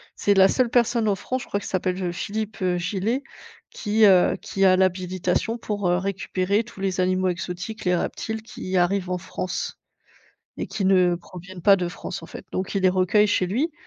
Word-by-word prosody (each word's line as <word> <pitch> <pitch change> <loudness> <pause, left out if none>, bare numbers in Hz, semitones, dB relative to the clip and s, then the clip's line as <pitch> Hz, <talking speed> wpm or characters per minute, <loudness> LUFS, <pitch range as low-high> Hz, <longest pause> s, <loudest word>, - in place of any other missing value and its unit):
c'est 205 - +2
la 190 -1 +6
seule 250 +4 +1
personne 235 -2 +2
en 200 - +2
France, 255 +6 -3
je - - -13
crois 200 - -1
qu'il - - -8
s'appelle 185 -1 -1
f - - -5
heu, 175 - -1
Philippe, 215 +3 -4
heu, 180 -1 +1
Gillet 200 +8 -1 0.5
qui, 215 0 +2
heu, 185 -3 +5
qui 195 - -2
a 185 -1 +6
l'habilitation 185 +3 0
pour, 205 -5 -2
heu, 175 - +3
récupérer 195 +2 -1
tous 235 -3 -14
les 190 -1 0
animaux 185 0 +1
exotiques, 180 +5 -4
les 180 -1 +2
reptiles 220 +5 -3
qui 190 -4 -4
arrivent 180 +1 +1
en 180 - 0
France 185 0 -4 0.8
et - - -3
qui 195 0 -3
ne 185 -2 +4
proviennent 180 +1 -11
pas 200 +2 +7
de 180 -2 -2
France, 180 +2 -7
en - - -9
fait. - - -10
Donc 190 +2 -3
il 195 - 0
les 185 - +6
recueille 185 +3 +3
chez 195 -3 +1
lui 275 - 0
190 Hz, 210 wpm, -24 LUFS, 180-210 Hz, 0.8 s, pas